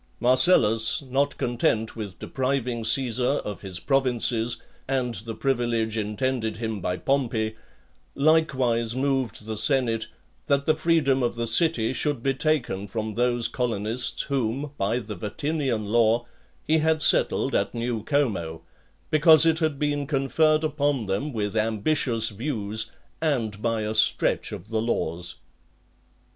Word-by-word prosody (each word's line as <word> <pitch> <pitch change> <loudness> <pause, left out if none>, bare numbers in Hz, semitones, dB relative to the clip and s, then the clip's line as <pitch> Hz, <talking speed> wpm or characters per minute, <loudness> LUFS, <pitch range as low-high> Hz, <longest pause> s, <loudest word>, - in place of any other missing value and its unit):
Marcellus, 120 -2 +4
not 140 +2 -1
content 115 -2 0
with 100 -6 -7
depriving 130 -2 -2
Caesar 125 +2 +1
of 105 -1 -6
his 95 -3 -3
provinces, 125 -3 +1 0.3
and 130 -2 -1
the 115 0 -6
privilege 120 -4 0
intended 110 +1 -2
him 110 -3 -4
by 90 0 -2
Pompey, 115 -5 -1 0.6
likewise 130 -7 +2
moved 130 -5 -1
the 110 0 -4
senate, 115 0 +1 0.4
that 140 0 +1
the 155 - +3
freedom 155 -5 +2
of 120 -1 0
the 115 0 -2
city 130 -4 +2
should 145 -4 -1
be 135 - +1
taken 130 -9 -1
from 110 +2 -4
those 120 0 +1
colonists 120 0 -1
whom, 135 +1 -2
by 100 +2 0
the 110 -3 -5
Vatinian 130 - -2
law, 115 +2 +2 0.4
he 160 +1 +3
had 160 0 +2
settled - - +2
at - - 0
New 115 -1 -2
Como; 95 - -1 0.5
because 155 0 +6
it 165 -1 +3
had 155 -4 0
been 145 -1 -1
conferred 155 +3 +2
upon 145 -5 0
them 100 +10 -2
with 105 -3 -3
ambitious 115 +1 0
views, 110 -2 -3 0.3
and 115 -10 -1
by 115 -1 0
a 105 0 -2
stretch 110 - +3
of 105 - -8
the 110 -1 -1
laws. 85 -7 -1
120 Hz, 135 wpm, -25 LUFS, 110-140 Hz, 0.6 s, because